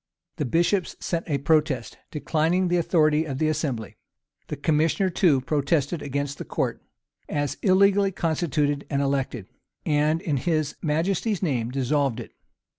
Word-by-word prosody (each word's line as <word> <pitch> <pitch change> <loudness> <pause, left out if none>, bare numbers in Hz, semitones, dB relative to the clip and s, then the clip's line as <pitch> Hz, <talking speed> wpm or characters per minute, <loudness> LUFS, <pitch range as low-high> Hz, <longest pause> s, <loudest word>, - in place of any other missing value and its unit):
[] - - -59
The 150 - -1
bishops 170 - +1
sent 170 -1 -3
a 145 - +1
protest, 145 -4 0
declining 165 +4 0
the 175 - +2
authority 155 -3 +3
of 135 -4 -4
the 155 +2 +1
assembly: 145 -8 -3 0.5
the - - -4
commissioner, 160 +6 +1
too, 165 -7 +3
protested 145 +3 0
against 140 0 -3
the - - -4
court, - - -2 0.5
as 145 -2 -1
illegally 200 +1 +4
constituted 150 -4 0
and 140 - 0
elected; 135 -6 -1 0.4
and, 150 +1 +2
in 150 -8 0
his 155 0 -1
majesty's 180 +6 0
name, 125 -9 0
dissolved 135 -1 0
it. 115 - -8
150 Hz, 145 wpm, -25 LUFS, 140-170 Hz, 0.5 s, illegally